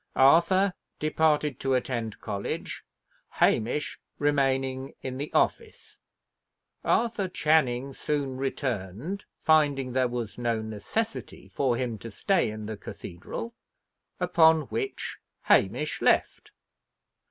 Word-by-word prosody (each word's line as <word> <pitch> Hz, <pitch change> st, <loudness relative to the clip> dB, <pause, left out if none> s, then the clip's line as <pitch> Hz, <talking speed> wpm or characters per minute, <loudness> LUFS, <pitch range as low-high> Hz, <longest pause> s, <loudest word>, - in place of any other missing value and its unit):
Arthur 175 Hz, +8 st, +5 dB, 0.2 s
departed 150 Hz, -3 st, +1 dB
to 135 Hz, -1 st, +1 dB
attend 120 Hz, -4 st, -2 dB
college, 100 Hz, -2 st, -4 dB, 0.5 s
Hamish 120 Hz, +7 st, +1 dB, 0.2 s
remaining 135 Hz, -2 st, 0 dB
in 130 Hz, 0 st, -4 dB
the 145 Hz, -, -4 dB
office. 455 Hz, -2 st, -1 dB, 0.8 s
Arthur 220 Hz, -5 st, +1 dB
Channing 140 Hz, -6 st, +2 dB
soon 140 Hz, -2 st, -2 dB
returned, 130 Hz, -, -3 dB
finding 145 Hz, -5 st, +3 dB
there 130 Hz, -1 st, +3 dB
was 120 Hz, -2 st, -5 dB
no 120 Hz, -2 st, 0 dB
necessity 110 Hz, -, -4 dB
for 130 Hz, -4 st, 0 dB
him 120 Hz, -4 st, -2 dB
to 115 Hz, -, -7 dB
stay 190 Hz, -, +1 dB
in 110 Hz, 0 st, -6 dB
the 110 Hz, 0 st, -5 dB
cathedral; 100 Hz, -, -7 dB, 0.7 s
upon 165 Hz, -3 st, +5 dB
which 405 Hz, -1 st, -3 dB, 0.2 s
Hamish -, -, +2 dB
left. -, -, +2 dB
135 Hz, 105 wpm, -27 LUFS, 120-160 Hz, 0.8 s, Arthur